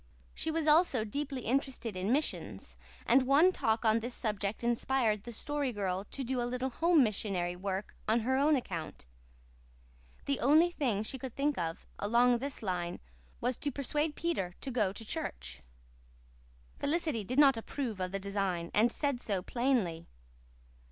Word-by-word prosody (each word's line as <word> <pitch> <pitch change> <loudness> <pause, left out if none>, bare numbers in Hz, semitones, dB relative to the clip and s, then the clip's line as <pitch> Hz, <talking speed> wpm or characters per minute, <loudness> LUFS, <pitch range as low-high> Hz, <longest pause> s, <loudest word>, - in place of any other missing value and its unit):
She 320 - -2
was 320 -1 0
also 300 -6 +4
deeply 275 +3 -3
interested 250 -3 -1
in 185 +4 -1
missions; 165 - -2 0.3
and 265 - +5
one 280 +8 +5
talk 225 -9 0
on 220 +1 +4
this 240 +2 -4
subject 210 -1 -2
inspired 235 -3 +1
the 240 - -6
Story 285 +3 -2
Girl 195 -3 -2
to 275 - -4
do 255 0 -1
a 240 - -1
little 255 +1 -2
home 330 +2 +4
missionary 195 -5 -1
work 190 +2 -4
on 230 +2 +3
her 260 +4 +1
own 290 +3 +4
account. 170 - -5 1.2
The 280 -1 0
only 315 +6 +5
thing 240 - 0
she 265 +4 -4
could 255 -1 -7
think 285 +1 +1
of, 165 0 -3
along 235 +3 +3
this 275 -2 -5
line, 180 -3 -2 0.4
was 245 0 0
to 290 - -2
persuade 295 +3 -1
Peter 195 - -2
to 270 - -4
go 215 -6 +1
to 225 +3 -8
church. 65 - -5 1.2
Felicity 305 -7 0
did 250 +7 -4
not 280 -3 +7
approve 230 -1 -4
of 185 -1 -2
the 195 - -1
design, 195 -4 -2
and 225 +3 +4
said 280 -4 -1
so 195 -6 -1
plainly. 225 -10 0
235 Hz, 165 wpm, -32 LUFS, 200-275 Hz, 1.2 s, not